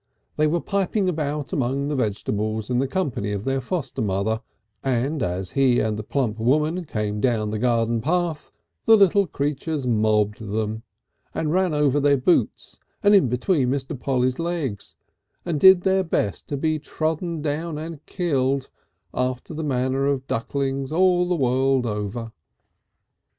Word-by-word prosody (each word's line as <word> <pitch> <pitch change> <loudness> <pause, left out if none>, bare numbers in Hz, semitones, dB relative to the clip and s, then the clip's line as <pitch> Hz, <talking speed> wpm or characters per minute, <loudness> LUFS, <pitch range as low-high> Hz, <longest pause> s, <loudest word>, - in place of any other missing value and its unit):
They 155 0 +3
were 170 +2 0
piping 200 0 0
about 150 -4 -2
among 135 +1 0
the 150 - -1
vegetables 110 -1 -2
in 125 - +2
the 135 - +1
company 130 - -2
of 100 0 -3
their 135 0 0
foster 135 -1 -3
mother, 105 +2 0 0.4
and 135 +3 0
as 90 -2 -2
he 130 -3 +3
and 110 -1 0
the 105 - -4
plump 115 -1 -2
woman 155 +9 +1
came 105 -5 -3
down 110 -4 +1
the 110 - -2
garden 115 -1 +1
path 170 +1 -1 0.3
the 225 - +8
little 200 -1 +4
creatures 145 0 -2
mobbed 105 -3 +2
them, 110 0 -3 0.5
and 155 -1 -1
ran 185 -3 +2
over 145 -1 +2
their 140 0 +4
boots 150 +7 0 0.2
and 205 0 +5
in 190 -11 +5
between 125 - +1
Mr. 135 +2 -2
Polly's 130 0 0
legs, 165 -12 -3 0.5
and 165 -4 -1
did 190 +1 +8
their 190 0 +2
best 105 - -2
to 145 - -3
be 155 +2 0
trodden 160 +1 -3
upon 155 +2 -2
and 155 -1 -7
killed 140 -7 0 0.4
after 125 +4 -2
the 160 +1 -4
manner 135 -1 0
of 135 -2 -1
ducklings 135 +3 -2
all 180 +1 +3
the 180 - +1
world 130 -2 +2
over. 105 +1 -4
135 Hz, 155 wpm, -23 LUFS, 115-160 Hz, 0.5 s, the